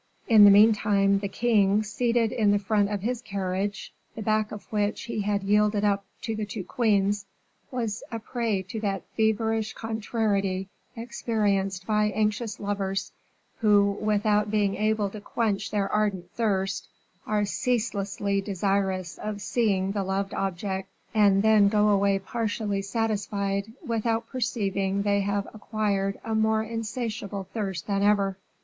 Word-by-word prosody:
In 220 -4 +8
the - - +10
meantime 200 -1 +5
the 200 - -3
king, 210 -1 +2
seated 230 +1 +1
in 215 -3 +2
the 205 - +4
front 205 0 +1
seat - - -3
of 200 - -5
his 245 +1 -1
carriage, 200 -2 -3 0.2
the 220 - -5
back 215 0 +1
of 210 - -7
which 210 0 0
he 230 -2 -3
had 200 -1 0
yielded 210 +1 +2
up 200 -1 +1 0.2
to 225 - -2
the 215 - -3
two 205 -1 -5
queens, 205 -2 +1 0.4
was 230 -4 -3
a 230 - -2
prey 225 -3 -2
to 190 +4 -6
that 195 -3 -2
feverish 220 0 +1
contrariety 205 -4 -1 0.3
experienced 205 -5 -1
by 210 0 +2
anxious 210 +1 -1
lovers, 195 -1 -2 0.5
who, 205 -2 +4
without 210 0 +2
being 205 -2 +1
able 215 -1 0
to 215 - -8
quench 205 -2 -1
their 200 -1 0
ardent 195 -4 0
thirst, 195 -4 -1 0.4
are 210 -1 +1
ceaselessly 200 -3 -1
desirous 195 -2 -1
of 210 -1 -4
seeing 195 -4 0
the 200 0 -1
loved 195 +1 -2
object, 190 0 -3 0.2
and 200 -2 +4
then 215 -2 +6
go 210 0 +3
away 200 -1 +3
partially 205 0 -2
satisfied, 200 -1 -2
without 230 -1 0
perceiving 200 -5 -1
they 200 0 +2
have 200 0 -1
acquired 205 -2 -1
a 225 - -2
more 220 0 +2
insatiable 220 -3 -4
thirst 195 -5 -3
than 200 -1 0
ever. 200 -1 +2
205 Hz, 145 wpm, -26 LUFS, 195-220 Hz, 0.5 s, the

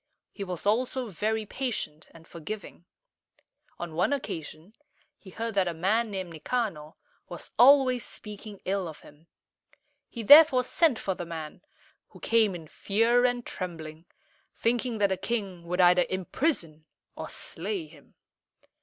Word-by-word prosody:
He 200 - -6
was 180 -2 -6
also 245 +3 0
very 215 +4 -1
patient 205 - -4
and 165 0 -17
forgiving. 175 +2 -8 0.9
On 175 -2 -6
one 180 - +1
occasion 165 - -6 0.5
he 195 - -13
heard 225 +4 -4
that 195 -2 +2
a 170 - -2
man 215 +7 +1
named 190 -3 -5
Ni 160 - -9
ca´nor 170 -7 -3 0.3
was - - -8
always 255 -1 +6
speaking 210 -1 -9
ill 195 -1 -1
of 155 - -10
him. 150 +3 -18 0.8
He 235 - -6
therefore 285 0 +8
sent 300 0 +2
for 195 - -2
the 175 -2 -7
man, 160 -2 -7 0.5
who - - -16
came 220 -4 +2
in 165 -2 -9
fear 230 +8 +2
and 245 -1 0
trembling, 165 -3 -7 0.5
thinking 235 0 0
that 200 -1 +2
the 190 - 0
king 195 -4 -4
would 180 +2 -2
either 180 0 +5
imprison 185 - -2 0.3
or - - -6
slay 385 -6 -4
him. - - -19
200 Hz, 145 wpm, -28 LUFS, 170-235 Hz, 0.9 s, therefore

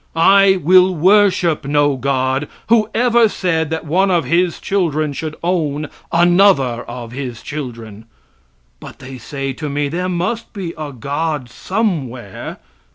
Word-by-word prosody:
I 195 +3 +5
will 185 +3 +5
worship 185 -2 +3
no 145 0 +2
God 130 +1 -1 0.2
who 220 -2 +3
ever 235 -2 +3
said 165 -6 -1
that 160 0 -4
one 185 +6 +2
of 175 -3 +1
His 175 0 +1
children 155 -7 -1
should 155 +2 -5
own 155 -4 -1 0.2
another 175 -8 +3
of 120 -1 -7
His 125 -3 -6
children. 115 -7 -7 0.7
But - - -11
they 130 -1 -10
say 135 +2 -5
to 150 +3 -5
me, 145 0 -1
there 180 +4 -2
must 185 +6 -3
be 185 -6 -5
a 155 -2 -6
God 145 0 -3
somewhere! 135 - -3
155 Hz, 140 wpm, -17 LUFS, 135-185 Hz, 0.7 s, I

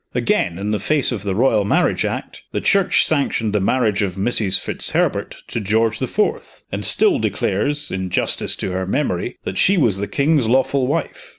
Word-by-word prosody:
Again, 85 -1 0
in 100 +2 -3
the 105 - 0
face 150 -3 +1
of 115 -5 -3
the 100 -2 -3
Royal 110 -2 +3
Marriage 100 - +1
Act, - - -5
the - - 0
Church 195 -2 +3
sanctioned 130 -8 0
the 105 - +1
marriage 105 -1 +1
of 95 -3 -2
Mrs. 100 -2 +1
Fitzherbert - - -1
to - - -3
George 110 +2 0
the 130 - -2
Fourth, 210 - -2
and - - -4
still 390 -10 +3
declares, 145 - -1
in 95 -1 -3
justice - - -1
to - - -4
her 95 0 -3
memory, 95 -5 -2
that 95 - -3
she 195 +1 +4
was 115 - +3
the 100 - -2
king's 140 -2 +1
lawful 130 +2 +2
wife. 155 +3 -3
110 Hz, 190 wpm, -19 LUFS, 100-140 Hz, -, she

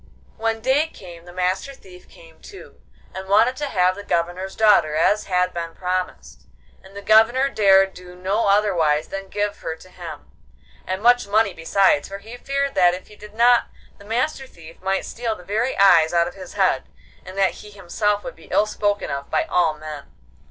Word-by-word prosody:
When 225 0 -2
day 270 +6 +2
came 175 - -13
the 175 - -12
Master 185 +9 -2
Thief 180 -6 -17
came 165 -1 -18
too, 395 - -14 0.3
and 190 0 -8
wanted 235 +6 +4
to 295 - -3
have 185 -6 +2
the 205 +2 -9
Governor's 180 +1 -2
daughter 205 -8 +4
as 205 +6 +2
had 180 -1 0
been 165 -1 -5
promised, 180 - -4 0.4
and 190 +1 -17
the 200 - -8
Governor 225 +6 +4
dared 195 -5 +4
do 180 0 -13
no 195 +5 -1
otherwise 170 -7 +2
than 195 0 -6
give 205 0 -2
her 160 - -5
to 185 +3 -17
him, 165 -5 -10 0.6
and 190 +3 -3
much 245 -1 +4
money 205 -1 +2
besides, 165 -1 +2
for 195 - -7
he 220 +4 -11
feared 275 +2 -2
that 180 -1 +4
if 185 - -12
he 210 - -15
did 210 0 -14
not 240 +1 +4 0.3
the - - -14
Master 260 +5 -2
Thief 165 -6 -15
might 190 +1 -1
steal 230 -2 -4
the 180 - -14
very 220 +7 -1
eyes 175 -5 +5
out 170 0 +3
of 175 - -7
his 185 -2 -11
head, - - +1 0.3
and 185 +1 -11
that 195 -1 +3
he 210 - -12
himself 205 +1 -2
would 255 - -7
be - - -17
ill 210 - +3
spoken 205 -1 -2
of 140 0 -5
by 155 - +1
all 165 -3 +1
men. 150 -2 -9
195 Hz, 195 wpm, -21 LUFS, 175-215 Hz, 0.6 s, eyes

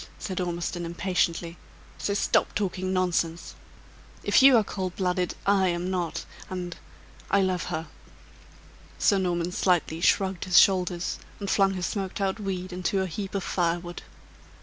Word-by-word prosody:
said 185 -2 -4
Ormiston, 175 0 -3
impatiently. 170 -1 -1 0.4
"So 200 - -1
stop - - +2
talking 185 -2 -1
nonsense. 170 -2 0 0.7
If - - +4
you 265 -2 +8
are 220 - +4
cold 185 -3 -4
blooded, 180 -1 0
I 195 -1 +4
am 175 +1 -1
not; 175 -3 -2 0.2
and 180 -1 -4 0.5
I 200 - +4
love 185 -2 0
her!" 160 -2 -3 1.1
Sir 200 -3 +3
Norman 175 -1 -1
slightly 175 -3 +1
shrugged 190 0 +2
his 185 -2 +3
shoulders, 180 -2 +3 0.2
and 200 -2 -2
flung 195 -1 +3
his 180 -1 -2
smoked 195 -2 -3
out 195 +1 -1
weed 185 -2 -4
into 185 +2 0
a - - 0
heap 190 +3 -5
of 195 - -1
fire 170 -2 +1
wood. 175 0 -8
185 Hz, 150 wpm, -27 LUFS, 175-195 Hz, 1.1 s, you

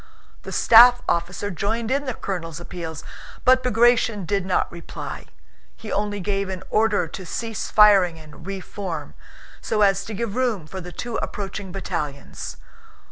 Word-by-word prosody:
The - - -8
staff 245 +2 +7
officer 180 +4 -1
joined 220 +7 -2
in 280 +2 0
the 255 -4 -3
colonel's 165 -5 -4
appeals, 165 -2 -7 0.4
but 255 0 +6
Bagratión 230 -4 +3
did 195 +1 -1
not 185 - +1
reply; 170 -1 -7 0.5
he 220 - -8
only 205 0 -1
gave 195 +1 -1
an 185 -1 -5
order 215 -5 +2
to 190 - -7
cease 225 +5 -4
firing 195 -5 +6
and 155 +2 -13
re 195 -1 -4
form, 185 -4 -6 0.5
so 215 -1 +1
as 195 0 +3
to 215 - -6
give 225 0 -3
room 240 -10 0
for 190 +4 -7
the 180 0 -8
two 240 +5 -4
approaching 195 -1 -5
battalions. 160 -7 -5
200 Hz, 155 wpm, -23 LUFS, 180-225 Hz, 0.5 s, staff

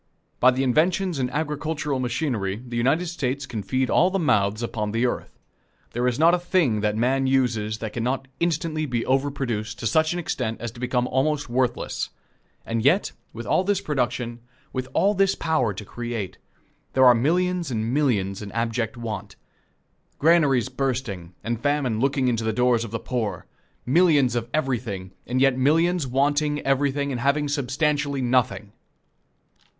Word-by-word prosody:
By 125 - +6
the 130 +1 +1
inventions 170 +5 +1
in 125 -1 0
agricultural 150 0 -2
machinery 120 -6 -1
the 120 -1 -7
United 135 +9 +2
States 140 -5 -2
can 115 -4 -5
feed 130 +7 0
all 180 - +4
the 195 - -1
mouths 105 - +1
upon 105 -3 -3
the 115 +2 +1
earth. 125 - -3 0.5
There 120 +1 0
is 125 -1 0
not 165 +3 +5
a 180 - +3
thing 170 - +1
that 105 0 0
man 130 +3 +1
uses 115 -5 +1
that 110 -1 -6
can 115 - -2
not 130 +2 -1
instantly 160 -2 -1
be 120 -3 -1
over 135 +2 +2
produced 115 -5 -3
to 120 - -6
such 155 +7 +3
an 175 - -2
extent 125 -9 -3
as 120 -2 -4
to 120 - -13
become 125 0 0
almost 145 +2 0
worthless; 125 0 -1 0.6
and 115 -1 -2
yet, 165 +10 +3 0.2
with 115 +1 -8
all 180 - +2
this 200 0 +1
production, 125 -5 -2 0.3
with 130 -1 -3
all 200 +2 +3
this 195 -1 +2
power 155 -9 +1
to 100 +1 -7
create, 120 -4 -5 0.5
there 130 0 +5
are 125 - +9
millions 175 +7 +1
and 115 -1 -2
millions 105 -10 +1
in 100 -1 -7
abject 115 0 -1
want. 110 -3 -5 0.8
Granaries 145 -6 +4
bursting, 125 -10 -3
and 115 0 -3
famine 145 -6 0
looking 135 0 +1
into 115 -2 0
the 110 - 0
doors 125 0 +2
of 115 - -6
the 115 - -3
poor! 110 -8 -3 0.4
Millions 145 -3 +4
of 120 -1 -2
everything, 115 -10 -2 0.2
and 125 +2 0
yet 135 -1 +3
millions 165 +3 +2
wanting 145 +3 +1
everything 140 +1 0
and 125 -2 -3
having 145 +3 +2
substantially 145 0 0
nothing! 125 -4 +1
130 Hz, 170 wpm, -24 LUFS, 115-150 Hz, 0.8 s, are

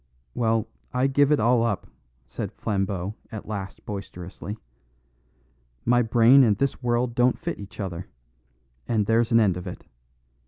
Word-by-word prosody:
"Well, 115 -2 +1 0.3
I 125 +1 +3
give 140 +1 +3
it 150 - +4
all 120 +2 +4
up," 115 -4 -1 0.4
said - - -5
Flambeau 95 -2 -2 0.2
at 110 - -7
last 100 -3 -6
boisterously. 100 0 -7 1.3
"My 120 +1 +4
brain 120 +3 +6
and 105 -4 +3
this 140 -1 -1
world 120 0 0
don't 125 +1 +3
fit - - -4
each 100 +1 -11
other; 90 -3 -4 0.8
and 110 -3 +1
there's 115 +2 +2
an 115 - +6
end 100 -5 +3
of 90 +1 -7
it. 90 - -8
110 Hz, 150 wpm, -25 LUFS, 100-120 Hz, 1.3 s, brain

